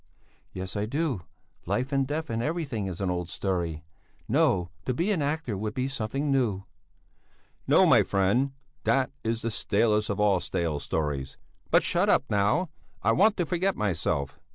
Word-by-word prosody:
"Yes, 95 +2 -6
I 105 +1 -1
do; 140 - -2 0.4
life 130 +3 -1
and 135 -1 +1
death 155 +1 -3
and 115 0 -1
everything 140 - -2
is 95 0 -5
an 95 -2 0
old 90 -1 -3
story 85 -6 -2 0.4
no 105 - +2
to 130 - -1
be 175 +10 +1
an 180 -7 +1
actor 145 -6 -1
would 105 +2 -4
be 130 0 0
something 135 +3 -2
new." 115 -8 +1 1.0
"No, - - +6
my - - +6
friend. 100 +8 +1 0.3
That 135 -1 +2
is 115 0 -1
the 115 - -1
stalest 105 +1 +1
of 100 0 -2
all 100 -3 +4
stale 80 -4 -2
stories. 70 -2 -3 0.3
But - - +5
shut - - +1
up, - - +4
now! 105 - +2 0.3
I - - +4
want 210 +2 +4
to 175 - +1
forget 185 +3 0
myself." 80 -8 -1
110 Hz, 170 wpm, -27 LUFS, 95-140 Hz, 1.0 s, No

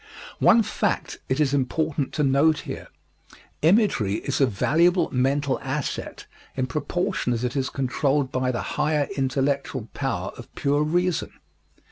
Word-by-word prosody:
One 230 - +6
fact - - -2
it 130 - 0
is 145 -3 +2
important 145 +1 0
to 150 - 0
note 140 +3 +3
here: - - -7 0.7
Imagery 160 - +3
is 140 +5 -2
a 135 - +5
valuable 165 - +2
mental 135 +2 +1
asset 135 +1 -4 0.3
in 130 - +1
proportion 155 +1 -1
as 115 0 -2
it 125 +1 -2
is 135 -1 0
controlled 135 +1 0
by 130 0 0
the 120 - -3
higher 150 -2 0
intellectual 135 -2 -1
power - - -2
of - - -11
pure 145 +1 +1
reason. 175 +2 0
140 Hz, 140 wpm, -24 LUFS, 130-155 Hz, 0.7 s, One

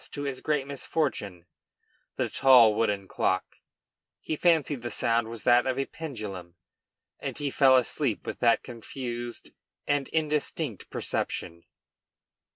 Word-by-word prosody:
to 145 - -5
his 135 -2 -4
great 150 -3 0
misfortune, 135 - -3 0.7
the - - 0
tall 125 -5 +6
wooden 105 -3 0
clock; 95 0 -1 0.6
he 155 - -3
fancied 155 -5 +2
the 120 - -4
sound 115 0 +1
was 115 -1 -7
that 120 +1 +4
of 130 - +1
the 135 +1 -1
pendulum, 105 - -7 0.6
and - - -5
he 145 -1 -2
fell 130 -1 +5
asleep 125 - -1
with - - -5
that 115 -1 +3
confused 120 0 -7 0.3
and 145 -2 0
indistinct 150 - -2
perception. 85 0 -3
125 Hz, 130 wpm, -27 LUFS, 110-145 Hz, 0.7 s, tall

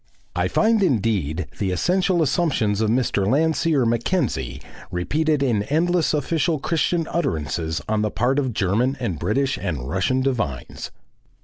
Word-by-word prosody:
I - - +1
find 220 -1 +2
indeed 100 - 0
the 100 - 0
essential 180 - +1
assumptions 130 - +1
of 110 - +1
Mr. 115 -5 +1
Landseer 155 - +2
Mackenzie 115 - -1 0.3
repeated 150 - 0
in 115 -6 +1
endless 165 - +1
official 155 +2 0
Christian 165 +3 0
utterances 80 - -2
on 110 0 0
the 105 - +1
part 125 +6 +1
of 130 -3 -1
German 115 +7 0
and 95 - -3
British 135 +5 0
and 75 -10 -3
Russian 95 - 0
divines. 115 - -3
125 Hz, 135 wpm, -22 LUFS, 100-155 Hz, 0.3 s, find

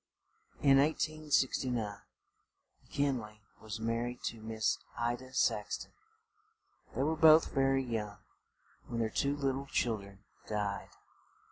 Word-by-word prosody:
In 135 -1 +7
1869 150 -4 +1
Mc 105 -3 -10
Kin 140 -2 +1
ley 105 -1 -11 0.2
was 110 0 -6
mar 115 +1 0
ried 120 0 -6
to 115 - -3
Miss 110 0 0 0.2
I 120 0 +1
da 130 +1 -12
Sax 130 - +1
ton. - - -11 1.0
They 135 - +1
were 155 +3 +1
both 160 0 +6
very 135 -1 +3
young 110 -4 -3 0.7
when 120 -1 -3
their 110 -1 0
two 140 +5 +1
lit 135 -2 0
tle 135 +1 -5
chil 115 -4 +1
dren 100 0 -14 0.2
died. 105 -2 -2
120 Hz, 140 wpm, -33 LUFS, 110-140 Hz, 1.0 s, In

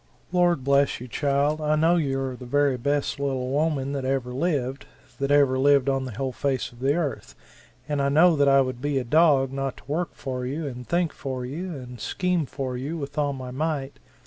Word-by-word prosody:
"Lord 175 -5 +2
bless 140 +1 +2
you, 125 - -8
child, 145 +4 0
I 150 0 +2
know 165 +3 +4
you 135 -5 0
are 130 -1 -3
the 125 0 -10
very 145 +1 +2
best 140 +3 -1
little 130 -2 -1
woman 145 -2 0
that 140 -2 -3
ever 130 -2 -1
lived 135 -3 -1 0.3
that 140 0 -1
ever 140 -2 +4
lived 140 -1 +4
on 135 -1 0
the 130 - -6
whole 130 +5 -2
face 135 0 -2
of 120 - -17
the 135 +3 +2
Earth! 160 -6 -3 0.5
And 145 -2 0
I 140 - +2
know 160 +4 +5
that 140 -1 +3
I 135 0 +6
would 130 -2 -3
be 145 0 0
a 130 - 0
dog 140 0 +4
not 135 -1 -3
to - - -15
work 165 +5 -2
for 130 -2 -4
you 145 +5 -3
and 125 -3 -6
think 170 -1 0
for 130 -2 -5
you 170 +7 -5
and 125 -3 -9
scheme 180 - -1
for 130 -2 -4
you 140 +7 -4
with 145 -1 -6
all 145 -1 +1
my 130 -2 -7
might. 140 0 -3
140 Hz, 220 wpm, -25 LUFS, 130-150 Hz, 0.5 s, I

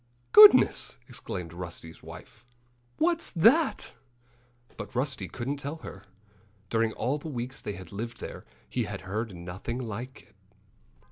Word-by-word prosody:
"Goodness!" 210 0 +8
exclaimed 85 -2 -6
Rusty's 85 -2 -8
wife. 105 - -12 0.5
"What's 335 +1 +1
that?" 250 - +3 0.8
But - - -8
Rusty 130 +1 -1
couldn't 135 +4 -4
tell 140 +2 -5
her. 160 - -10 0.7
During 115 -1 +2
all 135 +6 -1
the 155 - -8
weeks 125 -1 -5
they 105 - -4
had 95 -3 -10
lived 115 +4 -6
there - - -7 0.2
he - - -1
had - - -6
heard 105 +1 -4
nothing 90 +7 -6
like 125 +1 -6
that. - - -29
120 Hz, 135 wpm, -28 LUFS, 100-145 Hz, 0.8 s, Goodness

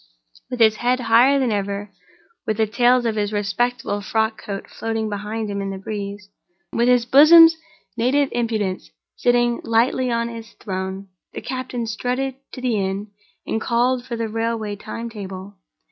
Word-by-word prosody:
With 250 - -5
his 220 -1 +5
head 250 +1 +1
higher 245 +4 +5
than 260 -4 +1
ever, 200 0 -3 0.6
with 215 - 0
the 220 - +3
tails 245 +3 +3
of 225 -2 0
his 205 0 0
respectable 210 +1 -1
frock 220 +2 -1
coat 200 -1 -6
floating 225 -1 -3
behind 210 +2 -4
him 200 -1 -3
in 195 - -3
the 195 - -5
breeze, 200 0 -6 0.5
with 235 +1 +2
his 245 -1 +4
bosom's 325 +6 +8 0.4
native 265 +4 +2
impudence 220 - -2 0.3
sitting 240 -1 +2
lightly 240 +3 +1
on 235 0 0
its 230 -1 -9
throne, 190 0 -5 0.2
the - - -6
captain 255 -2 -4
strutted 250 +4 -2 0.2
to 255 - -7
the 245 -4 0
inn 195 +1 -3 0.3
and 220 - -2
called 245 +2 +1
for 240 - -5
the 230 -1 -2
railway 225 -1 -2
time 230 +3 -7
table. 195 -3 -8
225 Hz, 160 wpm, -21 LUFS, 205-245 Hz, 0.6 s, bosom's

